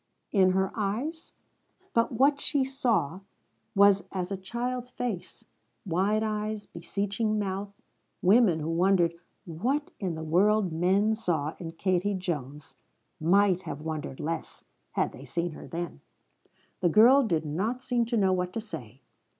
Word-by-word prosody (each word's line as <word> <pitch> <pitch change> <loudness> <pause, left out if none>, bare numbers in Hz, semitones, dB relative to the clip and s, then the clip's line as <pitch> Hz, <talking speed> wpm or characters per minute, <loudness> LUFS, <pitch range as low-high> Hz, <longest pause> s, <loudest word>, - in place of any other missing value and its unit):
in 185 -3 +4
her 190 0 +1
eyes. 235 +11 -3 0.6
But 230 0 +2
what 280 +4 +3
she 280 -2 +2
saw 235 - 0 0.6
was 200 -1 +6
as 185 0 -3
a - - 0
child's 245 +6 -4
face 235 -8 -4 0.4
wide 200 +5 +1
eyes, 215 -1 -2
beseeching 205 +5 -2
mouth. 200 0 -2 0.5
Women 190 -4 +5
who 155 - -3
wondered 175 0 +3 0.3
"what 245 - -2
in 185 -5 -2
the 160 - -5
world 190 +4 +3
men 190 +6 +2
saw 165 -8 -1
in 165 -2 -6
Katie 185 +3 0
Jones" 150 -6 -5 0.5
might 185 +2 +3
have 150 - -6
wondered 155 -4 -5
less 160 +1 -4 0.3
had - - 0
they 125 - -11
seen 170 +6 -2
her - - -10
then. 170 - -5 0.8
The 175 - +3
girl 240 - +7
did 165 - 0
not 210 +12 -2
seem 240 -2 +1
to 235 0 0
know 190 -3 +3
what 180 0 -1
to - - -2
say. 140 - -9
190 Hz, 145 wpm, -28 LUFS, 170-220 Hz, 0.8 s, girl